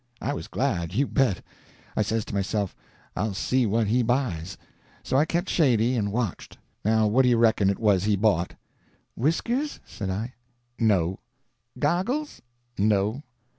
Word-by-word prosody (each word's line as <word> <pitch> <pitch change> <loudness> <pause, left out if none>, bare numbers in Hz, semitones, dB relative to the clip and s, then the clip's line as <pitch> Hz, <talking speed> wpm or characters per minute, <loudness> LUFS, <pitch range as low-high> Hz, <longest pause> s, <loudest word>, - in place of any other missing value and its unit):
I 140 - -2
was - - -6
glad, 90 -10 -1
you 140 +5 +3
bet. 135 -9 +1 0.5
I - - +2
says 110 +1 0
to - - -8
myself, 100 0 -1 0.4
I'll 105 -2 -1
see 125 +5 +1
what 110 +2 +1
he 115 +5 +2
buys. 115 - -1 0.5
So - - -2
I 145 +3 +5
kept 170 +3 -1
shady, 125 - +3
and 100 -4 0
watched. 110 -4 -3 0.3
Now 110 +1 +3
what 110 +5 +4
do 125 - +4
you 120 - +4
reckon 110 -4 +4
it 100 - 0
was 100 -4 +2
he 105 -1 +3
bought?" 95 -4 +1 0.6
"Whiskers?" 235 - 0
said 100 -3 -5
I. 110 +7 -3 0.5
"No." 95 -5 +2 0.6
"Goggles?" 195 - -1 0.4
"No." 105 +4 +2
110 Hz, 155 wpm, -26 LUFS, 100-130 Hz, 0.6 s, I